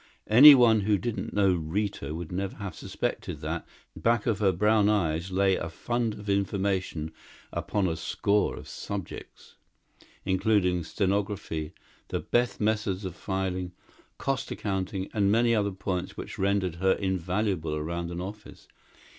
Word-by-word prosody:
Anyone 120 -3 +9
who 105 0 +2
didn't 115 +4 -4
know 100 -2 +3
Rita 85 -2 -2
would 85 0 -6
never 95 +1 -3
have 100 -4 -6
suspected - - -4
that, - - -4 0.3
back 115 -2 +1
of 110 -4 0
her 100 -3 +4
brown 105 +3 +3
eyes 85 -4 0
lay 95 0 +2
a 80 - -3
fund 115 +5 -2
of 105 - -10
information 95 -5 -1 0.4
upon 100 -3 0
a 80 - -1
score 100 +5 0
of - - -10
subjects 100 -4 -7 0.7
including 95 -2 +2
stenography, 95 -4 -2 0.3
the - - -2
best 120 0 0
methods 105 -3 0
of 90 -2 -5
filing, 95 -2 -3 0.4
cost 135 -2 -2
accounting, 95 -1 -3
and 100 -2 +2
many 115 +2 +3
other 105 -2 +2
points 95 -1 -4
which - - -7
rendered 95 -3 0
her 95 +2 +3
invaluable 95 -3 -1
around 85 +3 -3
an 85 0 -5
office. 105 +3 -9
95 Hz, 140 wpm, -28 LUFS, 90-105 Hz, 0.7 s, Anyone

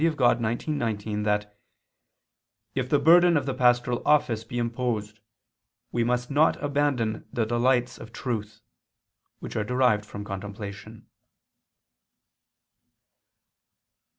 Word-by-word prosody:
Dei 165 - +4
xix, 155 - -6 0.5
19) 110 -7 -2
that 105 0 -1 1.2
"if 130 -1 -2
the 145 - +4
burden 170 +3 +6
of 140 - -1
the 135 - -2
pastoral 120 -1 +2
office 125 -7 +2
be 120 +2 -7
imposed, 115 -3 -2 0.7
we 120 - 0
must 125 +2 -1
not 150 +3 +4
abandon 140 -6 -1
the 115 - 0
delights 120 +1 +1
of 115 - -10
truth," 110 -3 -5 0.8
which - - -7
are 110 - 0
derived 125 -2 +2
from 100 0 -7
contemplation. 100 +2 -8
120 Hz, 110 wpm, -26 LUFS, 105-130 Hz, 1.2 s, burden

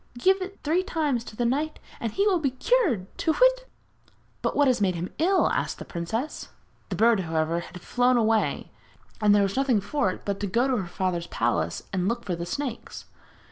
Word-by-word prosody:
Give 380 +9 +3
it 390 +2 -7
three 325 +5 +2
times 300 -10 -1
to - - -10
the 240 - -1
knight 295 +6 0 0.2
and 230 - -2
he 400 - +1
will 385 -4 +3
be 285 -4 +1
cured. 265 - +1
Tu 320 - +2
whit!' - - +3 0.7
'But - - -1
what 290 - +4
has 250 -4 +2
made 185 -3 +2
him 170 +2 -5
ill?' 370 +4 +3
asked - - -1
the - - -8
princess. 220 - -4 0.4
The - - -2
bird, 230 -1 +4
however, 165 -1 0
had 180 +1 -10
flown 245 +4 +2
away, 220 -1 +1 0.5
and 205 -1 +5
there 205 - +4
was 195 0 -1
nothing 265 -5 +2
for 200 +1 0
it 185 - -7
but 200 -1 -2
to 205 - -2
go 235 +7 +2
to 260 -2 +1
her 190 -4 -3
father's 175 -1 -2
palace - - -1
and 185 -1 0
look 235 +2 -2
for 180 - -1
the 170 +1 -5
snakes. 260 +3 -5
235 Hz, 210 wpm, -26 LUFS, 190-300 Hz, 0.7 s, and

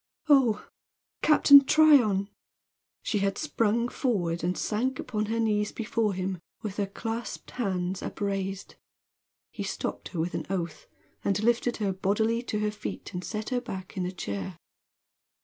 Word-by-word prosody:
"Oh, 265 -7 +4 0.5
Captain 285 -2 +8
Tryon!" 260 -11 +5 0.8
She 210 - 0
had 195 0 0
sprung 235 -6 +1
forward 175 - -1
and 180 +1 0
sank 250 +5 -1
upon 215 -4 -2
her 230 +1 -1
knees 210 -2 +1
before 220 -2 -1
him 185 0 -3 0.2
with 205 -2 -5
her 200 -2 0
clasped 225 +3 -5
hands 185 -5 -2
upraised. 195 -1 -3 0.7
He - - -7
stopped - - -4
her 175 - -6
with 170 +2 -1
an - - -4
oath, 170 -5 -3 0.4
and 200 +1 0
lifted 240 +1 +2
her 200 -3 0
bodily 220 +5 +1
to 230 -3 -3
her 210 0 +1
feet 210 -1 -7
and 180 0 -4
set 215 +3 -4
her 250 -2 0
back 190 -7 -7
in 185 -2 -1
her - - -1
chair. 100 - -5
210 Hz, 150 wpm, -28 LUFS, 190-235 Hz, 0.8 s, Captain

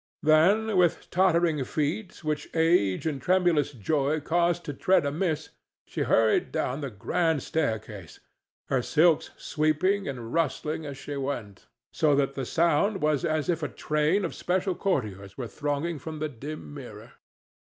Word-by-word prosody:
Then, 190 +8 +4
with 175 -2 +2
tottering 170 -5 +3
feet 165 - -3
which 150 -1 -2
age 160 - +2
and 145 -4 -2
tremulous 175 -3 +2
joy 140 +5 0
caused 170 +3 +1
to 145 - -4
tread 185 +2 +2
amiss, 155 +1 -1 0.4
she - - -5
hurried 110 -1 +2
down 130 +4 -2
the 140 - -3
grand 160 - 0
staircase, 110 - -3 0.5
her 130 -2 +2
silks 160 +4 +3
sweeping 170 +6 0
and 120 -4 -6
rustling 160 -1 -1
as 140 -1 -7
she 145 0 -6
went; 120 -8 -5 0.3
so 150 -3 +3
that 140 -1 +1
the 135 -1 -4
sound 170 +5 +2
was 150 -2 +2
as 155 -2 0
if 170 -2 0
a 150 - -1
train 150 +6 0
of 170 - -4
special 185 +1 -1
courtiers 105 - -2
were 125 -3 -4
thronging 145 +4 -2
from 155 +3 -7
the 155 0 -2
dim 145 +4 -8
mirror. 120 -5 -10
155 Hz, 155 wpm, -27 LUFS, 135-170 Hz, 0.5 s, Then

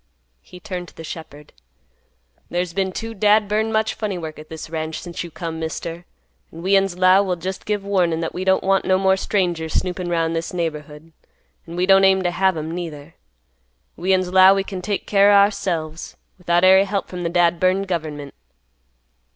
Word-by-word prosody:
He 180 - -14
turned 180 -3 -6
to - - -17
the 165 - -9
shepherd; 150 -2 -10 1.0
"There's 175 0 -2
been 190 0 -1
too 225 +4 -6
dad 210 0 +3
burned 215 +2 0
much 220 0 0
funny 205 -4 -4
work, 160 -3 -7
at 155 - -12
this 160 -1 -8
ranch, 160 0 -4
since 175 -1 -6
you 170 - -8
come, 165 0 -6
Mister, 165 +2 -5 0.5
an' 165 +1 -10
we'uns 195 -1 +2
'low 185 +1 +5
we'll 185 -3 -1
just 185 +2 -6
give 210 -1 -1
warnin' 180 -5 +1
that 165 -1 -3
we 180 - -4
don't 190 0 +2
want 195 0 +2
no 185 - +2
more 190 0 +3
strangers 175 -5 -1
snoopin' 180 -1 -2
'round 165 -1 0
this 165 +2 -4
neighborhood, 155 -1 -5 0.5
an' 165 - -8
we 180 +1 +1
don't 195 0 +5
aim 190 -1 +4
t' 175 - 0
have 190 0 +1
'em 155 +1 -4
neither. 165 -3 -7 0.8
We'uns 185 +1 0
'low 190 +1 +7
we 195 - 0
can 190 -1 -6
take 200 +2 -3
care 200 0 +4
o' - - +6
ourselves, 170 -6 0 0.2
without 175 0 +1
ary 190 +1 +6
hep 200 0 -2
from 180 -1 -6
th' 170 - -2
dad 175 -1 +2
burned 185 +2 +1
government." 155 -5 -4
180 Hz, 190 wpm, -21 LUFS, 165-195 Hz, 1.0 s, low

